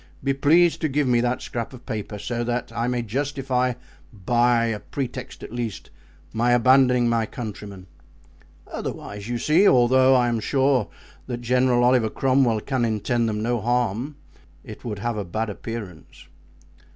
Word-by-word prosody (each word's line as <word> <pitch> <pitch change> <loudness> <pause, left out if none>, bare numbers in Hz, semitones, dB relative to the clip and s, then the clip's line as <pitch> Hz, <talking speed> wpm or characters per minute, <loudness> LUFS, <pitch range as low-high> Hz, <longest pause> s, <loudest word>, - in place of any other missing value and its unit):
Be 135 0 +1
pleased 165 +5 +3
to 155 - 0
give 140 0 0
me 120 -1 +3
that 125 +1 -1
scrap 120 +1 -5
of 125 - -13
paper 105 -1 -5
so 120 +3 -3
that 120 -1 -3
I 115 +1 -1
may 125 -1 -1
justify, 130 +1 -1 0.4
by 120 +3 +2
a 115 -2 -2
pretext 130 0 -6
at - - -9
least, 115 -6 -5 0.4
my 120 +2 +2
abandoning 125 0 +4
my 115 -2 +1
countrymen. 105 -5 -8 0.8
Otherwise, 100 +2 -6
you 120 - -1
see, 165 - +3
although 130 +1 +5
I 125 -1 +3
am 120 -1 0
sure 135 -1 +1 0.4
that 120 -1 -4
General 125 0 +2
Oliver 125 -3 +3
Cromwell 130 -3 +2
can 130 -1 -1
intend 115 +1 0
them 105 0 -3
no 120 -1 0
harm, 120 +3 -1 0.5
it - - -11
would 110 -4 -4
have 115 +2 -3
a 105 - -2
bad 110 +4 -3
appearance." 105 -5 -8
120 Hz, 160 wpm, -23 LUFS, 115-130 Hz, 0.8 s, although